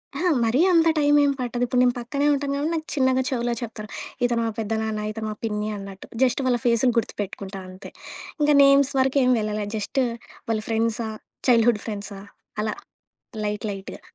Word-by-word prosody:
అహా! 350 Hz, +6 st, +1 dB, 0.2 s
మరీ 245 Hz, +6 st, +2 dB
అంత 330 Hz, -1 st, +5 dB
టైమేం 290 Hz, -1 st, +4 dB
పట్టదు. 245 Hz, 0 st, -2 dB
ఇప్పుడు 250 Hz, +1 st, +2 dB
నేను 245 Hz, -1 st, +3 dB
పక్కనే 280 Hz, +4 st, -2 dB
ఉంటాను 280 Hz, 0 st, 0 dB
కాబట్టి 300 Hz, +4 st, -1 dB
నాకు 315 Hz, -1 st, -3 dB
చిన్నగా 260 Hz, -1 st, +3 dB
చెవులో 240 Hz, -2 st, -1 dB
చెప్తారు. 215 Hz, -2 st, -7 dB, 0.4 s
ఇతను 235 Hz, -1 st, +1 dB
మా -, -, 0 dB
పెద్దనాన్న, 220 Hz, 0 st, -2 dB
ఇతను 220 Hz, 0 st, -5 dB
మా -, -, -6 dB
పిన్ని 210 Hz, 0 st, -2 dB
అన్నట్టు. 195 Hz, -1 st, -9 dB, 0.2 s
జస్ట్ 255 Hz, +2 st, +2 dB
వాళ్ళ 245 Hz, -1 st, +3 dB
ఫేసులు 240 Hz, +1 st, +3 dB
గుర్తుపెట్టుకుంటా 200 Hz, -3 st, -3 dB
అంతే. 185 Hz, +1 st, -11 dB, 0.5 s
ఇంక 295 Hz, -, +3 dB
నేమ్స్ 275 Hz, 0 st, +5 dB
వరకు 265 Hz, +1 st, +2 dB
ఏమి 255 Hz, -, +4 dB
వెళ్ళల. 210 Hz, 0 st, -2 dB
జస్ట్ 215 Hz, +6 st, -1 dB, 0.5 s
వాళ్ళ 220 Hz, -1 st, +1 dB
ఫ్రెండ్సా, 225 Hz, 0 st, 0 dB, 0.4 s
చైల్డ్‌హుడ్ 230 Hz, -2 st, +4 dB
ఫ్రెండ్సా 205 Hz, -2 st, -5 dB, 0.4 s
అలా 215 Hz, -, -1 dB, 0.7 s
లైట్, 210 Hz, +1 st, -2 dB
లైట్‌గా. 195 Hz, -1 st, -8 dB
235 Hz, 165 wpm, -24 LUFS, 215-265 Hz, 0.7 s, అంత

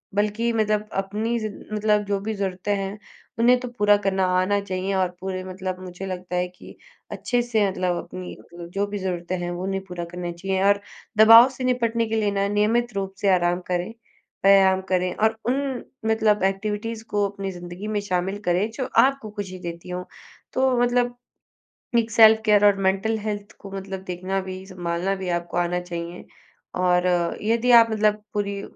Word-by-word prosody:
बल्कि 210 Hz, +3 st, +1 dB
मतलब 215 Hz, -1 st, 0 dB, 0.2 s
अपनी 220 Hz, +4 st, -2 dB
ज़िन 215 Hz, -2 st, -6 dB
मतलब 210 Hz, 0 st, +2 dB
जो 200 Hz, -1 st, -1 dB
भी 220 Hz, +3 st, -3 dB
ज़रूरतें 195 Hz, 0 st, -2 dB
हैं, 195 Hz, +1 st, -4 dB, 0.4 s
उन्हें 245 Hz, +2 st, +5 dB
तो 250 Hz, -, -5 dB
पूरा 205 Hz, -4 st, +3 dB
करना 190 Hz, -1 st, +2 dB
आना 200 Hz, +2 st, +1 dB
चाहिए 190 Hz, -1 st, -3 dB
और 185 Hz, -1 st, +1 dB
पूरे 185 Hz, 0 st, -4 dB
मतलब 185 Hz, 0 st, -5 dB
मुझे 185 Hz, +1 st, -8 dB
लगता 180 Hz, -1 st, -5 dB
है 180 Hz, 0 st, +1 dB
कि 180 Hz, 0 st, -14 dB, 0.4 s
अच्छे 245 Hz, -1 st, 0 dB
से, 225 Hz, -4 st, +1 dB
मतलब 185 Hz, -2 st, -1 dB
अपनी 180 Hz, +1 st, -8 dB
मतलब 170 Hz, 0 st, -11 dB
जो 200 Hz, +1 st, 0 dB
भी 205 Hz, -, -4 dB
ज़रूरतें 180 Hz, -1 st, -3 dB
हैं, 175 Hz, 0 st, -3 dB
वो 175 Hz, +1 st, -5 dB
उन्हें 195 Hz, 0 st, -2 dB
पूरा 180 Hz, -2 st, -6 dB
करने 175 Hz, 0 st, -5 dB
चाहिए, 190 Hz, +2 st, -2 dB
और 200 Hz, 0 st, +4 dB, 0.4 s
दबाव 225 Hz, +4 st, +9 dB
से 260 Hz, 0 st, -7 dB
निपटने 235 Hz, -2 st, +1 dB
के 225 Hz, -, -1 dB
लिए 210 Hz, -2 st, +1 dB
ना, 200 Hz, 0 st, 0 dB
नियमित 220 Hz, +4 st, +1 dB
रूप 195 Hz, -1 st, -3 dB
से 200 Hz, -, +3 dB
आराम 175 Hz, 0 st, +2 dB
करें, 180 Hz, +4 st, -2 dB, 0.5 s
व्यायाम 190 Hz, -1 st, +6 dB
करें, 180 Hz, -1 st, +1 dB
और 220 Hz, +1 st, +1 dB
उन 265 Hz, +1 st, -1 dB, 0.2 s
मतलब 220 Hz, -2 st, +2 dB
एक्टिविटीज़ 210 Hz, +3 st, -2 dB
को 205 Hz, -1 st, +1 dB
अपनी 195 Hz, -1 st, -5 dB
ज़िंदगी 175 Hz, +3 st, -8 dB
में 210 Hz, -1 st, -1 dB
शामिल 190 Hz, 0 st, -1 dB
करें, 180 Hz, +5 st, +1 dB
जो 260 Hz, +3 st, -4 dB, 0.2 s
आपको 275 Hz, -4 st, +1 dB
खुशी 195 Hz, -3 st, -6 dB
देती 170 Hz, 0 st, -7 dB
हों। 180 Hz, 0 st, -4 dB, 0.5 s
तो 260 Hz, -1 st, +2 dB
मतलब 245 Hz, 0 st, +1 dB, 0.8 s
एक 225 Hz, 0 st, -2 dB
सेल्फ़ 220 Hz, 0 st, +7 dB
केयर 210 Hz, -1 st, +5 dB
और 205 Hz, -1 st, +5 dB
मेंटल 195 Hz, +4 st, +1 dB
हेल्थ 205 Hz, -1 st, -4 dB
को 195 Hz, -, -10 dB
मतलब 195 Hz, 0 st, -5 dB
देखना 185 Hz, +1 st, -3 dB
भी, 185 Hz, 0 st, -7 dB
सँभालना 180 Hz, 0 st, -2 dB
भी 190 Hz, -1 st, -5 dB
आपको 175 Hz, 0 st, -2 dB
आना 175 Hz, 0 st, +1 dB
चाहिए, 175 Hz, 0 st, -7 dB, 0.5 s
और 180 Hz, 0 st, +2 dB, 0.3 s
यदि 230 Hz, +3 st, +1 dB
आप 230 Hz, -1 st, +8 dB
मतलब 210 Hz, -1 st, +1 dB
पूरी 200 Hz, -1 st, -2 dB
195 Hz, 180 wpm, -24 LUFS, 185-220 Hz, 0.8 s, दबाव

